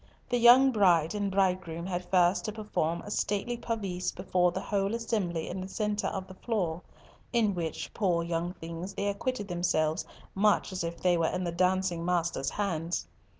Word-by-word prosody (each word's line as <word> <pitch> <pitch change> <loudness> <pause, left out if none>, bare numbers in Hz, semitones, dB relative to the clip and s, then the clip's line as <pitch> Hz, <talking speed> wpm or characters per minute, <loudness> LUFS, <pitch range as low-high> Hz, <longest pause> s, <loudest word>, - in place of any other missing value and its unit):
The 245 -1 +1
young 250 +3 +8
bride 175 -7 +4
and 205 -1 -1
bridegroom 185 -3 0
had 180 -1 -4
first 180 0 +3
to 215 - -2
perform 190 -6 -2
a 205 - -7
stately 210 +4 -1
pavise 200 -7 -3
before 180 -1 +1
the 180 - -3
whole 200 +2 -1
assembly 195 -8 -2
in 185 +1 -4
the 185 - -5
centre 210 +1 -1
of 190 -1 -3
the 190 - -11
floor, 185 -6 -2 0.5
in 225 -4 +2
which, 165 -3 -4
poor 175 -5 +1
young 170 +1 -2
things, 170 +4 -7
they 200 - -2
acquitted 205 +2 -2
themselves 175 -2 0 0.3
much 210 +1 +2
as 185 -2 -3
if 170 0 -4
they 180 -1 +3
were 165 -1 +2
in 185 - -2
the 175 - -1
dancing 180 -1 +1
master's 170 -6 0
hands. 170 - -2
185 Hz, 180 wpm, -29 LUFS, 170-205 Hz, 0.5 s, young